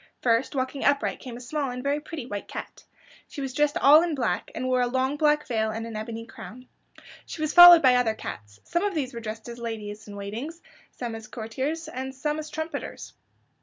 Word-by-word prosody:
First, 240 +4 +2
walking 260 +1 -2
upright 285 0 +1
came 245 -2 -8
a - - -9
small 275 +3 -3
and 250 0 -6
very 285 +1 0
pretty 300 -3 -7
white 205 -5 -6
cat. - - -8 0.4
She - - -9
was 270 -2 -4
dressed 295 +1 +1
all 295 +3 +7
in 340 -3 -1
black, 230 -10 -1
and 255 - -3
wore 255 -1 +2
a 245 - +2
long 260 +3 0
black 300 0 +2
veil, 220 -5 0
and 225 +1 -4
an 230 -1 -7
ebony 225 +1 -5
crown. 230 +3 -11 0.6
She - - -7
was 310 -1 -1
followed 350 -2 +11
by 255 -1 +7
other 245 -3 +2
cats. 105 - -8
Some 345 +2 -1
of 405 -3 -1
these 270 -4 -2
were 235 - -5
dressed 220 0 -7
as 240 0 -8
ladies 220 -2 -6
in 205 - -9
waiting, 205 +8 -5 0.4
some 240 -2 -6
as 225 -1 -8
courtiers, 260 +9 -4
and 265 -3 -6
some 300 +3 -2
as 310 0 -6
trumpeters. 315 +2 -6
255 Hz, 215 wpm, -26 LUFS, 225-295 Hz, 0.6 s, followed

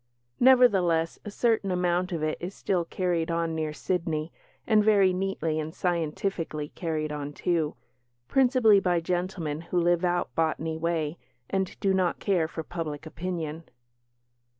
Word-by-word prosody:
Nevertheless, 195 -11 +4
a 210 - -6
certain 220 -1 +1
amount 180 0 0
of 165 -3 -2
it 155 0 -1
is 180 +3 -5
still 180 -3 0
carried 175 -2 -1
on 165 -1 0
near 155 -1 -2
Sydney, 160 -1 -2 0.3
and 215 -2 +4
very 200 -3 +4
neatly 180 -4 -1
and 155 +1 -5
scientifically 165 -2 -2
carried 155 -3 -3
on, 145 -1 -5
too 165 -2 0 0.5
principally 250 -6 +5
by 180 -3 +1
gentlemen 175 -3 -2
who 175 +1 -1
live 175 0 +2
out 175 0 0
Botany 160 0 0
way 160 -1 -2 0.3
and 190 -1 -1
do 195 -2 +2
not 185 -2 +1
care 180 -6 +1
for 160 0 -6
public 160 -3 -5
opinion. 165 -1 -5
175 Hz, 145 wpm, -27 LUFS, 160-190 Hz, 0.5 s, principally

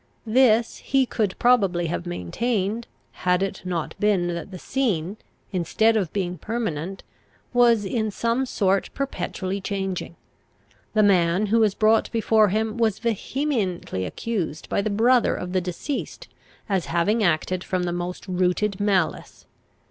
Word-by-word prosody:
This 230 -1 +3
he 270 -1 +1
could 210 -6 -1
probably 195 -8 +3
have 170 +2 -3
maintained, 210 - -2 0.3
had 180 +1 +2
it 195 0 -4
not 175 -4 -3
been 195 -4 +2
that 170 +3 -6
the 190 - -8
scene, 205 -5 -1 0.3
instead 215 +5 +2
of 195 -7 0
being 180 -4 -3
permanent, 195 -5 -3 0.5
was 235 -4 +4
in 220 +2 -1
some 235 +5 -1
sort 195 -4 +1
perpetually 195 -6 -3
changing. 190 -3 -3 0.8
The 215 - +5
man 185 0 +3
who 225 +3 +2
was 215 -3 +3
brought 220 +1 +3
before 220 -2 +3
him 220 +3 -1
was 220 -4 +2
vehemently 225 - -2
accused 175 - -4
by - - +1
the 215 - -1
brother 235 +4 +3
of 180 0 -5
the 185 - +2
deceased 180 - -5 0.4
as 195 -5 0
having 205 +7 +1
acted 175 +1 +1
from 185 -1 -1
the 175 -1 -1
most 175 +2 -5
rooted 185 +2 0
malice. 195 -6 -1
200 Hz, 140 wpm, -24 LUFS, 180-225 Hz, 0.8 s, The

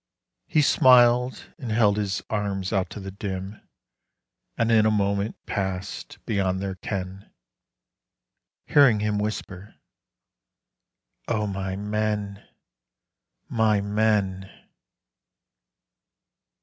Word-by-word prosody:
He 155 - +3
smiled 125 -1 +4
and 125 -5 -6
held 105 -2 +3
his 100 -2 -2
arms 100 -2 -2
out 95 -2 0
to - - -8
the 95 -1 -7
dim, 95 +1 -6 1.0
And 115 0 +1
in 110 -1 +5
a - - +4
moment 100 0 0
passed 95 -2 -4
beyond 95 -3 0
their 95 0 -3
ken, 95 +1 -6 1.3
Hearing 130 -8 +5
him 105 -1 0
whisper, 105 -2 -5 1.5
"O 110 -2 0
my 95 -1 -3
men, 105 0 -2 1.0
my 110 -2 +2
men!" 100 -2 0
105 Hz, 95 wpm, -25 LUFS, 95-110 Hz, 1.5 s, in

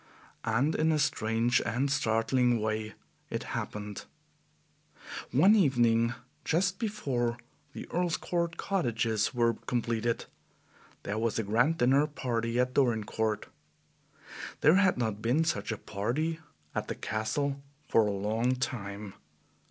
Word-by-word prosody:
And 125 +8 +2
in 160 +1 +2
a 155 - +2
strange 120 -4 +1
and 130 +5 0
startling 120 -1 +2
way 110 0 -2 0.3
it - - -3
happened. 105 -1 -5 1.3
One 165 - +6
evening, 120 - +3 0.3
just 185 +4 +1
before 135 - -1 0.4
the - - -7
Earl's 175 -1 0
Court 170 -1 -2
cottages 115 - 0
were 115 -1 +3
completed, 115 -1 -1 0.8
there 105 +2 -2
was 115 0 0
a 115 - 0
grand 120 +10 +2
dinner 135 +4 +4
party 120 -5 -2
at 125 0 +1
Dorincourt. 110 -4 +1 1.2
There 155 +5 +6
had 190 -2 +4
not 110 -4 -2
been 125 +8 +2
such 160 -7 -1
a 110 - -2
party 135 +14 -2 0.3
at - - -2
the - - -3
Castle 135 +7 -2 0.3
for 110 -2 +4
a - - 0
long 110 +5 0
time. 105 -6 -4
120 Hz, 125 wpm, -30 LUFS, 110-145 Hz, 1.3 s, One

